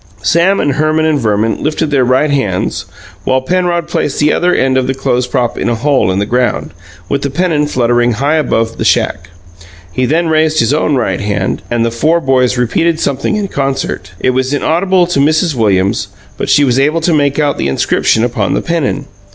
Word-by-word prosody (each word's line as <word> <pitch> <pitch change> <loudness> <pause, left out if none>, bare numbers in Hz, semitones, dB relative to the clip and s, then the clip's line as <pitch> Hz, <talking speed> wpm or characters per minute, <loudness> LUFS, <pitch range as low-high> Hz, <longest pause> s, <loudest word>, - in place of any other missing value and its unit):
Sam 170 - +2
and 145 - +1
Herman 155 +3 +1
and 155 -2 +1
Verman 110 -1 0
lifted 155 0 -1
their 135 -3 +3
right 130 +4 +2
hands, 105 -10 -1 0.4
while 130 +5 +1
Penrod 175 +3 -1
placed 145 - -2
the 150 0 +2
other 180 0 +1
end 135 -6 +1
of 130 -1 +1
the 135 - -1
clothes 125 -1 -1
prop 125 -2 -1
in - - -1
a 120 - 0
hole 135 -3 +1
in 95 - -1
the 100 - 0
ground, 125 +3 -1 0.4
with 140 - -1
the 140 - -2
pennon 150 -1 0
fluttering 120 -2 +1
high 140 +7 0
above 115 -6 -1
the - - -1
shack. 85 0 0 0.6
He 125 +6 -1
then 165 +4 +1
raised 155 0 +2
his 115 +4 +2
own 150 -1 +1
right 125 -5 -1
hand, 100 -1 -2
and 120 -1 0
the 115 - -1
four 155 +9 +1
boys 130 -4 +1
repeated 160 +7 0
something 140 +8 -1
in 205 -2 -2
concert. 135 -5 -3
It 130 - +1
was 130 +2 0
inaudible 180 +4 +1
to 170 -5 -1
Mrs. 155 +3 +2
Williams; 100 -5 +1 0.3
but - - -4
she 145 - +4
was 130 -1 +2
able 150 +4 +1
to 165 +1 +1
make 145 -2 +1
out 145 -2 0
the - - 0
inscription 90 +10 +1
upon 120 0 -1
the - - 0
pennon. 165 -5 -1
140 Hz, 205 wpm, -13 LUFS, 120-155 Hz, 0.6 s, she